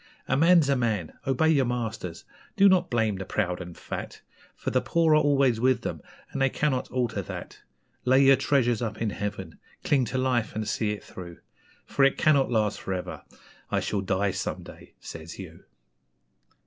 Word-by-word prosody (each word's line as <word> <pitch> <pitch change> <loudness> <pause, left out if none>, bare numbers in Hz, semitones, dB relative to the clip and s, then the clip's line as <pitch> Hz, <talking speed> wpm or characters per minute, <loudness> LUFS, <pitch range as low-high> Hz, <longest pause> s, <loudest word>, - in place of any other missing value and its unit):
A - - +1
man's 165 +1 +5
a 140 - +3
man! 110 -9 -1
Obey 135 +4 +2
your 140 -5 +3
masters! 115 -8 -4 0.3
Do 200 0 +6
not 185 -2 +3
blame 110 -5 +1
the 95 - -4
proud 90 -2 -2
and 90 -1 -9
fat, - - -7 0.3
For - - -4
the 130 - +2
poor 165 -2 +2
are 155 - +5
always 135 -5 +3
with 125 0 +2
them, - - -4 0.3
and 135 - -3
they 135 - +4
cannot 135 -2 -1
alter 125 -2 -1
that. - - -8 0.4
Lay 130 +2 +5
your 135 0 +7
treasures 125 -4 +1
up 110 -2 -3
in 110 -2 -1
Heaven 105 0 -5 0.2
cling 135 -4 +2
to 125 +4 -3
life 130 -3 0
and 110 0 -3
see 110 - -1
it 105 0 -4
through! 85 -2 -10 0.5
For 140 - +1
it 135 - +4
cannot 140 -3 +3
last 110 -3 0
for 95 - -3
ever 90 - -6 0.5
'I - - +1
shall 100 - -1
die 100 +1 0
some 95 - -4
day,' - - -14
says 80 0 -9
you. 85 -4 -10
120 Hz, 185 wpm, -26 LUFS, 105-135 Hz, 0.5 s, your